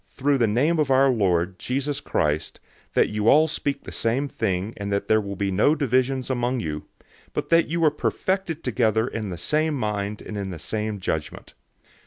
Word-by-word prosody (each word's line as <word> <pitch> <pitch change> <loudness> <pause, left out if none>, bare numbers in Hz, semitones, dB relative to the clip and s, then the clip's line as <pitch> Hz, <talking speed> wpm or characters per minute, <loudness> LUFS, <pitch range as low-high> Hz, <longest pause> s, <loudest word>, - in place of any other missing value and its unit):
"} - - -36
through 140 0 0
the 115 - +3
name 145 +10 +2
of 150 -3 +1
our 135 +1 +5
Lord, 90 -5 +1
Jesus 140 +2 -2
Christ, 75 +1 -1 0.4
that - - +4
you 105 0 -1
all 155 +2 +6
speak 140 -3 -3
the - - -8
same 125 +5 0
thing 100 -4 -2
and 100 0 -4
that 100 0 -1
there 110 0 +4
be 100 -1 -3
no 110 +11 +3
divisions 130 -2 +1
among 125 0 0
you, 75 -7 -4 0.5
but - - -3
that 165 0 +5
you 170 +2 -1
be 160 - +6
perfected 185 -1 -1
together 110 -2 +1
in 110 -4 -4
the 90 - -5
same 155 - +1
mind 105 -4 -2
and 105 - -6
in 100 -1 -4
the 90 - -6
same 105 +4 -3
judgment. 80 -4 -4
115 Hz, 195 wpm, -24 LUFS, 100-140 Hz, 0.5 s, all